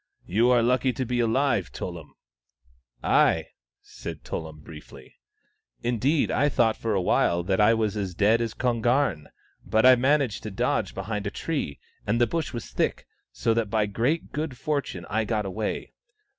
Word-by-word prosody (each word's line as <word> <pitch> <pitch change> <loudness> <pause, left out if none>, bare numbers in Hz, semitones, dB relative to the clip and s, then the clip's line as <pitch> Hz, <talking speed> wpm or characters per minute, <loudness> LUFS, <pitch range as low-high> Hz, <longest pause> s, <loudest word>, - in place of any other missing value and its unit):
" - - -41
You 115 +6 +2
are 120 -2 +4
lucky 125 +2 +2
to 130 - -2
be 125 +1 -1
alive, 115 -3 +1
Tullum." 85 -4 -7 0.5
" 60 -1 -37 0.2
Ay," - - -1 0.3
said - - -8
Tullum 80 -2 -6
briefly. 75 0 -13 0.3
" - - -44
Indeed, 135 +6 +1
I 145 +3 +2
thought 115 -5 +2
for 110 -2 -2
a 95 - +1
while 85 0 +2
that 95 +3 +1
I 110 +2 +5
was 110 -2 0
as 95 -4 -3
dead 110 +5 +3
as 115 -2 -3
Kon 120 -3 0
garn. 120 - +1 0.4
But 110 +2 +2
I 130 0 +9
managed 130 -2 +1
to 110 - -5
dodge 95 - -1
behind 100 +1 -3
a - - 0
tree, 140 - -3 0.3
and 115 +3 +1
the 120 - +5
bush 160 +6 -2
was 120 - -7
thick, - - -1 0.3
so 115 - 0
that 115 -2 0
by 110 0 +1
great 120 +11 -1
good 150 -3 -4
fortune 140 - -3
I 110 +2 0
got 105 -1 -1
away. 105 +3 -4
115 Hz, 185 wpm, -26 LUFS, 100-125 Hz, 0.5 s, I